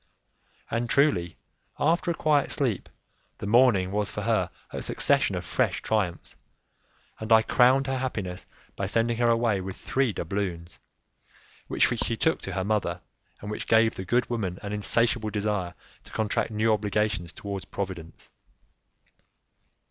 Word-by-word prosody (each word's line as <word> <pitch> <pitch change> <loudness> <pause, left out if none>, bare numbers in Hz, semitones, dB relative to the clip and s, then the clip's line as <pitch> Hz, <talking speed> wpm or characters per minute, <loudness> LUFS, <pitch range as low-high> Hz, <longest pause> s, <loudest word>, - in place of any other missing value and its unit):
And 120 +1 -1
truly, 90 - +2 0.4
after 170 +4 +1
a 170 - 0
quiet 150 -3 +2
sleep, 120 -9 -1 0.5
the - - -6
morning 105 -4 +4
was 105 0 0
for - - -5
her - - +1 0.2
a - - -5
succession - - +2
of - - -4
fresh - - 0
triumphs, 100 -6 -1 0.8
and 110 +1 -6
I 110 0 +7
crowned 130 +3 +4
her 135 -1 -1
happiness 100 -8 -4 0.3
by 100 - -2
sending 115 +2 +1
her 120 0 +3
away 115 -4 +2
with 95 0 -6
three 135 -3 0
doubloons, 90 -5 -4 0.9
which - - +3 0.2
she 115 - -2
took 160 - +1
to - - -5
her 95 - -1
mother, 100 -4 -1 0.4
and 105 - -6
which 105 - -5
gave 110 0 +4
the 95 - -6
good 120 +5 +1
woman 100 -7 -2
an 100 0 -4
insatiable 115 +2 +1
desire 105 -4 -2 0.3
to - - -15
contract 110 0 0
new 110 0 +2
obligations 105 -3 -1
towards 100 +1 -6
Providence. 90 -5 -6
105 Hz, 150 wpm, -27 LUFS, 95-120 Hz, 0.9 s, I